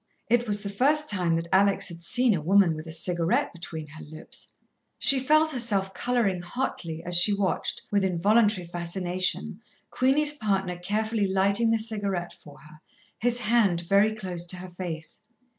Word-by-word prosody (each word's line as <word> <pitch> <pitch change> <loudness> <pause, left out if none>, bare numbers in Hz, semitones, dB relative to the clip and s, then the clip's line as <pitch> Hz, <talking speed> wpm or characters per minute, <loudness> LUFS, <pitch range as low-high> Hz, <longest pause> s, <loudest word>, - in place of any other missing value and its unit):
It 240 0 +2
was 205 0 +1
the 200 - -4
first 290 +9 +1
time 180 -5 0
that 165 +1 -3
Alex 195 +1 +3
had 170 -1 -10
seen 245 +6 +2
a 170 - -2
woman 185 +1 +4
with 155 +1 -8
a - - -7
cigarette 170 +1 -1
between 165 -2 -7
her 155 +1 -11
lips. 155 +1 -9 0.5
She 275 - +4
felt 310 +4 +3
herself 205 -7 -1
colouring 230 -7 0
hotly, 175 -5 -4
as 175 0 -1
she 200 +4 +7
watched, 200 -2 -1
with 200 -1 +2
involuntary 200 +2 +2
fascination, 175 +3 -2 0.3
Queenie's 290 +4 +3
partner 195 -8 -1
carefully 210 +3 -1
lighting 200 +4 +2
the 225 - +3
cigarette 205 -5 -3
for 145 - -16
her, 155 +1 -17 0.4
his 245 +1 0
hand 210 -6 +2
very 200 +5 +3
close 185 -5 -3
to 175 - -4
her 180 0 -9
face. 175 -1 -7
195 Hz, 165 wpm, -26 LUFS, 175-220 Hz, 0.5 s, she